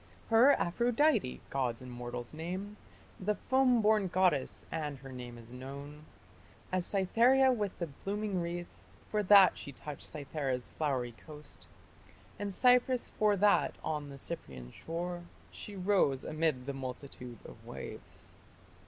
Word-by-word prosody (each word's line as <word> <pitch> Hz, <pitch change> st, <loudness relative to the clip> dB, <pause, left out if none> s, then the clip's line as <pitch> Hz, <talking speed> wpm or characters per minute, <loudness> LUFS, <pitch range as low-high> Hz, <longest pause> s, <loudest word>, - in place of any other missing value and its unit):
Her 245 Hz, +5 st, +7 dB
Aphrodite 240 Hz, -, +2 dB
gods 125 Hz, -4 st, -1 dB
and 125 Hz, -1 st, -9 dB
mortals 120 Hz, +1 st, -6 dB
name, 185 Hz, +6 st, -5 dB, 0.4 s
The 210 Hz, +2 st, 0 dB
foam 255 Hz, -2 st, +3 dB
born 210 Hz, -2 st, +4 dB
goddess; 180 Hz, -6 st, +1 dB
and 150 Hz, -3 st, -3 dB
her 135 Hz, +1 st, -11 dB
name 125 Hz, -2 st, -8 dB
is 115 Hz, 0 st, -13 dB
known 140 Hz, +4 st, -8 dB, 0.7 s
As 185 Hz, -1 st, 0 dB
Cytherea 240 Hz, +7 st, +4 dB
with 210 Hz, -6 st, -2 dB
the 170 Hz, -, -2 dB
blooming 195 Hz, +5 st, -3 dB
wreath, 175 Hz, +1 st, -5 dB, 0.3 s
For 210 Hz, -, +2 dB
that 200 Hz, -1 st, +7 dB
she 140 Hz, -, -7 dB
touched 145 Hz, +1 st, -8 dB
Cythera's 140 Hz, -4 st, -3 dB
flowery 130 Hz, -6 st, -1 dB
coast; 150 Hz, +4 st, -13 dB, 0.7 s
And 205 Hz, -1 st, -2 dB
Cypris, 250 Hz, +3 st, +4 dB
for 210 Hz, -1 st, +3 dB
that 205 Hz, +1 st, +3 dB
on 150 Hz, -2 st, -3 dB
the 140 Hz, -, -9 dB
Cyprian 65 Hz, -, -7 dB
shore 175 Hz, +2 st, -4 dB, 0.3 s
She 205 Hz, -, -8 dB
rose, 180 Hz, -8 st, +2 dB
amid 155 Hz, -5 st, 0 dB
the 140 Hz, -, -3 dB
multitude 125 Hz, -2 st, -7 dB
of -, -, -12 dB
waves. -, -, -9 dB
165 Hz, 135 wpm, -32 LUFS, 135-205 Hz, 0.7 s, Her